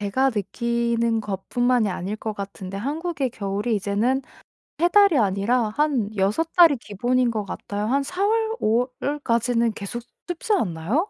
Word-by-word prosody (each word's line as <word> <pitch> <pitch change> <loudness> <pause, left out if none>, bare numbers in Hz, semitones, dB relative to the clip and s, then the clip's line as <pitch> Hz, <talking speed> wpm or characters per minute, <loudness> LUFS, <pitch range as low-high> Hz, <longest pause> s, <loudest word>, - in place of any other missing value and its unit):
제가 260 +7 +1
느끼는 235 +2 0
것뿐만이 220 +3 0
아닐 195 +3 -3
것 215 -1 -4
같은데 195 -1 -7
한국의 285 - -2
겨울이 205 +1 -2
이제는 210 +7 0 0.6
3 345 - +4
달이 400 -5 +5
아니라 215 +3 +2
한 260 -3 0
6 210 +13 +1
달이 330 -6 +7
기본인 240 +3 0
것 215 -2 -3
같아요. 205 +1 -4
한 275 +3 +1
4 365 +7 -1
월, 445 +1 +1
5 235 +4 +2
월까지는 235 -5 +1
계속 205 +5 -6 0.3
춥지 355 +5 -1
않나요? 220 - 0
235 Hz, 280 characters per minute, -23 LUFS, 205-280 Hz, 0.6 s, 달이